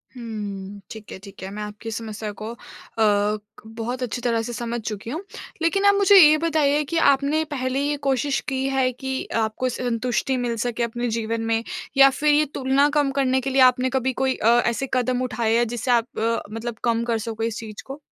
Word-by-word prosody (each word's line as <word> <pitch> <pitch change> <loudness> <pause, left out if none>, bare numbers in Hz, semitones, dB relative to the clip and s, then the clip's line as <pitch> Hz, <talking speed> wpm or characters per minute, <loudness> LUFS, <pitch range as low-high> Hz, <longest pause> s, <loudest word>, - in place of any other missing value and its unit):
हुँ। 205 -4 -6
ठीक 220 -2 -10
है - - -6
ठीक 195 -1 -12
है। 190 - -5
मैं 210 +1 -5
आपकी 210 +2 -7
समस्या 220 -1 -5
को 220 +1 -4
अ, - - -12 0.4
क 210 -1 +2 0.2
बहुत 230 +3 -5
अच्छी 245 0 -3
तरह 230 -2 +1
से 240 +2 -5
समझ 235 +1 -3
चुकी 215 0 -5
हूँ। 315 +8 -4 0.4
लेकिन 390 +5 +1
आप 405 0 +6
मुझे 400 0 +5
ये 310 -5 +8
बताइए 300 -2 +2
कि 335 - -1
आपने 280 +3 +1
पहले 260 -1 -1
ये 290 +1 0
कोशिश 270 +1 +1
की 265 -1 -2
है 265 -1 +1
कि 265 +1 -4 0.2
आपको 220 +4 -1
संतुष्टि 250 +2 -1
मिल 240 -2 -1
सके 240 -1 -2
अपने 240 +1 -2
जीवन 225 0 -2
में? 225 0 0 0.3
या 275 0 +9
फिर 295 +3 +2
ये 300 +1 +4
तुलना 270 +2 +2
कम 290 -2 +2
करने 265 -1 +1
के 270 - -2
लिए 270 0 +3
आपने 255 0 +5
कभी 260 0 0
कोई 265 +1 0
अ, - - -1 0.2
ऐसे 235 +3 -1
कदम 255 0 +1
उठाए 230 -2 0
हैं 240 0 +2
जिससे 240 +2 -2
आप 235 -1 +3
अ, 230 +1 0
मतलब 230 +1 -4
कम 230 -1 +1
कर 235 -1 0
सको 225 0 -4
इस 225 -1 -2
चीज़ 215 -2 -9
को? 275 +2 -8
245 Hz, 210 wpm, -23 LUFS, 225-270 Hz, 0.4 s, या